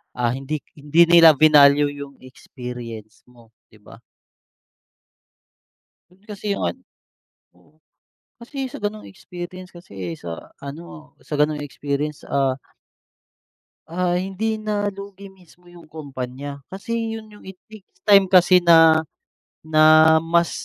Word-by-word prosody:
ah 120 -1 0
hindi 135 +4 -4 0.2
hindi 150 +4 +3
nila 165 -2 +7
vinalue 145 -1 +5
yung 140 -1 -10
experience 125 -4 -10
mo, 120 -2 -21 0.2
di 110 - -21
ba? 105 - -16 2.3
Kasi 205 0 -4
yung - - -4
ano 85 - -9 0.8
oo. 145 - -28 0.7
Kasi 270 +3 -6
sa - - -7
ganong 210 +1 -4
experience 185 -1 -10
kasi 95 - -8
sa 85 -1 -9
ano, 155 +3 -11
sa - - -7
ganong 150 0 0
experience 145 +2 -4
ah 135 -2 0 1.3
ah 175 +1 -1
hindi 195 +4 -3
na 210 -1 -2
lugi 200 0 -11
mismo 180 -2 -22
yung 175 -1 -16
kumpanya. 140 -2 -8 0.2
Kasi 225 +3 -4
yun 220 -1 -10
yung 210 -1 -17
it 190 - -9 0.2
takes 215 -3 -17
time 200 -2 +5
kasi 185 0 +5
na 165 -2 +5 0.6
na 155 0 +3 0.4
mas, 170 +1 +1
165 Hz, 120 wpm, -21 LUFS, 140-190 Hz, 2.3 s, nila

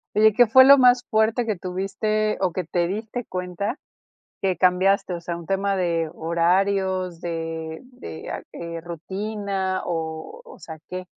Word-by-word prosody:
Oye, 215 0 +5
¿qué 245 +2 +6
fue 260 +4 +7
lo 280 +1 +9
más 250 -1 +5
fuerte 220 +2 +2
que 215 -3 -1
tuviste 195 +4 -1
o 185 -2 +2
que 180 -1 -3
te 175 +1 0
diste 220 +5 -4
cuenta 180 - -4 0.6
que 185 -3 0
cambiaste? 185 0 +3
O 170 - -5
sea, 170 0 -4
¿un 170 - -10
tema 195 0 0
de 170 -3 0
horarios, 185 +2 0
de 165 -1 -4
de, 85 - -9
ah, - - -4
eh, 170 -1 -6
rutina, 190 +2 -3
o 165 - -4
o 470 - -13
sea, 160 -1 -9
qué? 185 0 -5
185 Hz, 160 wpm, -23 LUFS, 170-215 Hz, 0.6 s, lo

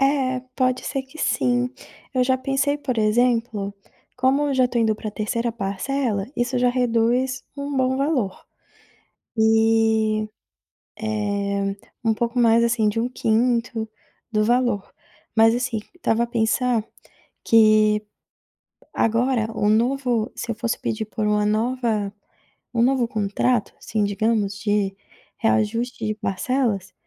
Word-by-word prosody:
É, 270 -2 +2 0.2
pode 255 -1 +1
ser 270 - -2
que 265 +4 -16
sim. 125 - +1 0.4
Eu 255 - +3
já 260 0 +2
pensei, 270 +2 0
por 255 -5 -2
exemplo, 225 -2 +1 0.4
como 270 +3 +2
eu 280 - 0
já 255 -1 +3
tô 240 - -1
indo 220 -2 +2
pra 215 0 -6
3ª 230 +3 -2
parcela, 205 +1 -2
isso 245 +1 0
já 245 0 +3
reduz 245 +1 +1
um 280 0 -4
bom 260 0 +2
valor, 270 -9 -1 0.9
eh 220 -1 +3 0.8
eh, 200 -2 -1 0.3
um 225 -1 +3
pouco 235 +3 -2
mais 230 -1 +5
assim 230 -2 +2
de 220 +2 -2
1/5 230 -1 0 0.4
do 215 -1 +2
valor. 240 -3 +1 0.4
Mas 225 +1 +5
assim, 245 -2 -1 0.2
estava 235 -9 +1
a - - -2
pensar 235 0 +1 0.6
que 215 -1 +5 0.9
agora 230 0 +1
o 205 -1 +1
novo 240 0 +1
se - - -5
eu - - -1
fosse 235 +2 -2
pedir 220 0 -2
por 215 0 -3
uma 210 0 +2
nova 220 -2 0 0.6
um 235 - +1
novo 255 -1 +3
contrato, 215 +2 0
assim, 215 -1 -1
digamos, 205 -1 0
de 205 -2 0 0.4
reajuste 230 +2 0
de 215 0 -1
parcelas, 205 -1 -1
230 Hz, 130 wpm, -23 LUFS, 215-250 Hz, 0.9 s, mais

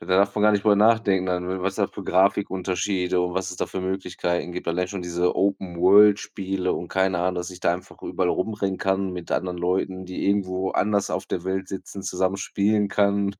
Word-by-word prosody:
Da - - -11
darf 100 +2 +3
man 105 - 0
gar 105 0 +5
nicht 100 -1 +1
drüber 105 -1 +4
nachdenken, 105 -3 +3
an 90 +1 -2
was 95 0 -1
das - - 0
für - - -8
Grafikunterschiede 95 -1 +1
und 90 0 -1
was 95 0 -2
es 90 - -8
da - - -2
für 95 - -5
Möglichkeiten 90 -2 -2
gibt, 90 -1 -5
allein 90 +2 0
schon 100 0 -5
diese 90 0 0
Open-World-Spiele 95 0 +3
und 85 - -4
keine 95 -1 +1
Ahnung, 90 +1 0
dass 90 +1 -4
ich 90 -1 -11
da 85 - +2
einfach 90 - -8
überall 90 - -1
rumrennen 100 -1 -1
kann 95 0 0
mit 90 -1 -6
anderen 90 -1 -1
Leuten, 95 +1 -1
die 90 0 -4
irgendwo 95 -2 0
anders 100 0 +1
auf 95 - -2
der 90 - -3
Welt 95 0 -2
sitzen, 95 0 -7
zusammen 95 +1 -1
spielen 105 +1 +1
kann 100 0 +1
95 Hz, 205 wpm, -24 LUFS, 90-100 Hz, -, gar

